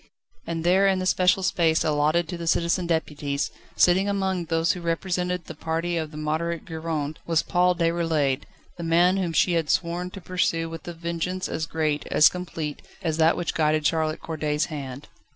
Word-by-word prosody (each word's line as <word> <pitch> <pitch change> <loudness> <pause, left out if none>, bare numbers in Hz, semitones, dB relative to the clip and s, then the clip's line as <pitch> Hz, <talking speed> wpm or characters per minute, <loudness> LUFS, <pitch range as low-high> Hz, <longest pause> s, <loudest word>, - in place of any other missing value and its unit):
And 165 -1 -3
there 190 +3 +4
in 190 -1 +3
the 185 - -2
special 185 +1 +3
space 165 -3 +2
allotted 155 +2 +2
to 180 - -3
the 170 -1 -6
Citizen 170 +2 +1
Deputies, 145 -4 -1 0.2
sitting 190 +3 +4
among 190 -3 -1
those 165 +1 +1
who 180 - -5
represented 180 +1 -1
the - - -7
party 165 +3 -2
of 160 -2 -2
the 150 - -10
Moderate 160 +2 -2
Gironde, 160 -3 -3
was 165 -1 +2
Paul 180 0 +2
Déroulède, 165 -5 +1 0.3
the - - -4
man 175 +3 +4
whom 180 -3 -1
she 175 +2 +3
had 165 -2 0
sworn 175 +1 0
to 195 - -9
pursue 170 -3 -1
with 165 0 -8
a 175 - -4
vengeance 170 +2 -3
as 160 0 -3
great, 155 -2 -1
as 150 - +6
complete, 165 -4 -5 0.2
as 160 -2 -1
that 165 +1 +4
which 175 - -2
guided 155 -1 +1
Charlotte 155 0 +1
Corday's 150 -2 -1
hand. 135 -2 -6
165 Hz, 185 wpm, -25 LUFS, 155-180 Hz, 0.3 s, as